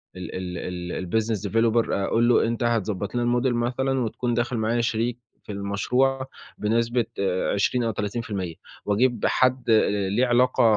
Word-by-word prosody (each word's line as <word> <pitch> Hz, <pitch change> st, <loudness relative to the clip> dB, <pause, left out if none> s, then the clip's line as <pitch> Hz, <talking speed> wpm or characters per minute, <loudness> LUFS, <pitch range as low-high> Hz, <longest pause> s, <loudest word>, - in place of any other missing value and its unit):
ال 90 Hz, 0 st, -7 dB, 0.3 s
ال 90 Hz, +1 st, -4 dB
الBusiness 110 Hz, +1 st, 0 dB
Developer 115 Hz, +2 st, +2 dB
أقول 115 Hz, +4 st, +1 dB
له 120 Hz, -, +4 dB
أنت 115 Hz, +1 st, -2 dB
هتضبَّط 105 Hz, -3 st, -1 dB
لنا 120 Hz, -, +1 dB, 0.2 s
الModel 125 Hz, 0 st, +1 dB
مثلًا، 130 Hz, +3 st, 0 dB
وتكون 120 Hz, 0 st, -1 dB
داخل 120 Hz, +1 st, -1 dB
معايا 115 Hz, +2 st, +1 dB
شريك 115 Hz, +1 st, -1 dB, 0.2 s
في -, -, -8 dB
المشروع 125 Hz, +7 st, 0 dB, 0.3 s
بنسبة 115 Hz, +2 st, +1 dB
آآ، 95 Hz, -2 st, 0 dB
20 120 Hz, +5 st, +1 dB
أو 115 Hz, -, 0 dB
30% 100 Hz, -4 st, -3 dB, 0.3 s
وأجيب 120 Hz, +4 st, +1 dB
حد 130 Hz, -1 st, +2 dB
آآ، 105 Hz, -3 st, +3 dB
ليه 115 Hz, +6 st, +2 dB
علاقة 125 Hz, 0 st, +3 dB
115 Hz, 150 wpm, -24 LUFS, 100-120 Hz, 0.3 s, له